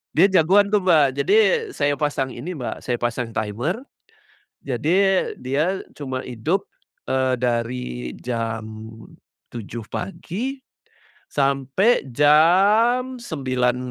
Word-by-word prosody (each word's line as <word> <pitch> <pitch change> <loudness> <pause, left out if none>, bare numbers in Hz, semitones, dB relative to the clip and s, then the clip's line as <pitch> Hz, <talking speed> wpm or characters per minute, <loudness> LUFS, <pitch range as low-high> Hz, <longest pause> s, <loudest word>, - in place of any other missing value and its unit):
Dia 180 +5 +6
jagoan 190 +2 +4
tuh 205 -2 +1
Mbak. 160 -6 +5
Jadi, 395 - +2 0.4
saya 145 - 0
pasang 140 -2 -1
ini 145 +10 -6
Mbak, 135 -8 -6
saya 120 -1 -2
pasang 120 -1 -2
timer. 115 - -2 0.8
Jadi, 180 +9 +1
dia 150 +9 0 0.2
cuma 130 -3 -4
hidup, 135 - -2 0.4
eee, 130 -1 +1
dari 120 0 -1 0.3
jam 115 -2 -3 0.8
7.00 115 0 -7
pagi, 215 +8 -5 0.7
sampai 140 - +1
jam 200 - +4
sembilan 130 - -1
145 Hz, 105 wpm, -22 LUFS, 125-190 Hz, 0.8 s, Dia